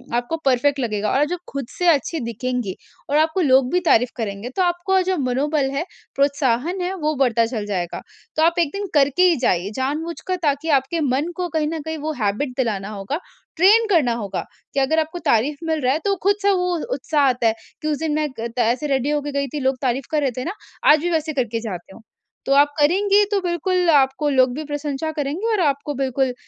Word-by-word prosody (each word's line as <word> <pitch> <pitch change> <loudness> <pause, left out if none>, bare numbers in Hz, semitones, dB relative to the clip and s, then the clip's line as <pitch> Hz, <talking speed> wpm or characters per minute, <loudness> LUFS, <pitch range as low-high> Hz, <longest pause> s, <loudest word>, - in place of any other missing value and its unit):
आपको 245 +7 -1
परफेक्ट 275 +2 +2
लगेगा। 215 -4 -1
और 280 +3 +3
जो 355 +4 -3
खुद 275 -2 -4
से 355 - +1
अच्छी 320 0 +2
दिखेंगी 235 -3 -3 0.3
और 290 - +2
आपको 315 +4 +2
लोग 265 -4 +4
भी 360 - +3
तारीफ 250 -9 +3
करेंगे 215 0 -4
तो - - +1
आपको 355 +2 +1
जो 370 0 0
मनोबल 275 +2 0
है, 280 +5 -2 0.3
प्रोत्साहन 280 +4 +1
है 360 +1 -2
वो 310 -4 -1
बढ़ता 235 -4 +3
चल 225 -3 -4
जाएगा। 180 -4 -3 0.3
तो 315 - +2
आप 335 +1 +4
एक 335 -4 +2
दिन 400 0 -3
करके 285 +3 +3
ही 360 -2 +5
जाइए 185 -6 +1
जानबूझकर 320 +7 -2
ताकि 290 +2 0
आपके 280 +3 +1
मन 285 +4 0
को 360 +1 -2
कहीं 310 -1 0
न 320 +1 -3
कहीं 320 +1 -5
वो 310 +1 -3
हैबिट 210 +8 0
दिलाना 210 -6 -1
होगा, 205 +7 -4 0.4
ट्रेन 415 +7 +6
करना 305 - +3
होगा 205 -5 -4 0.3
कि - - +1
अगर 275 +4 +2
आपको 320 +3 -3
तारीफ 265 +7 +2
मिल 320 -1 -1
रहा 255 0 +2
है 305 - -1
तो 400 -1 +2
खुद 400 +1 +4
से 405 0 +3
वो 360 -2 +1 0.2
उत्साह 290 +3 0
आता 250 -3 +2
है। 220 - +3 0.3
कि 305 - -3
उस 300 -1 0
दिन 315 -1 -1
मैं 305 0 0
क 230 +1 -3
त - - 0
ऐसे 245 +5 +1
रेडी 270 0 0
हो 295 0 +1
के 290 0 -5
गई 280 0 -1
थी 300 - -2
लोग 265 -1 0
तारीफ 255 0 -1
कर 305 -1 +1
रहे 275 -3 +1
थे 255 - -2
ना 350 - -2 0.4
आज 305 - +6
भी 350 - -1
वैसे 315 -1 -1
करके 240 -5 -1
जाती 190 -4 -7
हूँ, - - -14 0.4
तो 275 - +2
आप 290 +1 +4
करेंगी 395 +7 +4
तो 405 - +2
बिल्कुल 360 0 0
आपको 280 0 +3
लोग 260 -2 +3
भी 310 - -4
प्रशंसा 290 +1 -3
करेंगे 310 +9 -2
और 430 - +1
आपको 285 +1 -2
बिल्कुल 265 -1 0
285 Hz, 225 wpm, -21 LUFS, 255-325 Hz, 0.4 s, ट्रेन